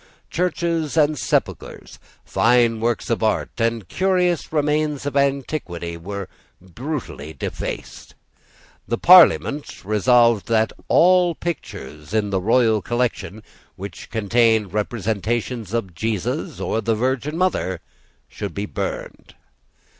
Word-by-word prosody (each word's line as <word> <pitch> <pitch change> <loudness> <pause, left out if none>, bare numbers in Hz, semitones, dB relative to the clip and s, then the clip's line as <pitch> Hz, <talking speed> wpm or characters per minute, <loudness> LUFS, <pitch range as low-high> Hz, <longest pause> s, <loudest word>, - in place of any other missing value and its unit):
Churches 170 -3 -1
and 155 0 +4
sepulchres, - - -3 0.3
fine 120 -1 +3
works 115 +1 -1
of 115 - 0
art 110 -1 0
and 115 -4 0
curious 180 -3 0
remains 150 -1 0
of 145 - -3
antiquity, 135 - -1
were 100 +3 -6 0.3
brutally 95 - -6
defaced. 70 - -6 0.7
The 115 - -1
Parliament 160 - +5
resolved 115 +2 +3
that 110 -1 +1
all 180 -1 +4
pictures 75 - -6
in 105 -2 0
the 95 -1 0
royal 110 +1 +3
collection 115 -3 -2 0.3
which 100 -1 -9
contained 110 -1 +2
representations 110 +1 -2
of 110 -6 -2
Jesus 105 +2 -3
or 110 - -1
of 110 - -7
the 115 - +2
Virgin 130 +6 -1
Mother 185 +1 0 0.5
should - - -6
be - - -2
burned. - - -6
115 Hz, 115 wpm, -21 LUFS, 105-150 Hz, 0.7 s, Parliament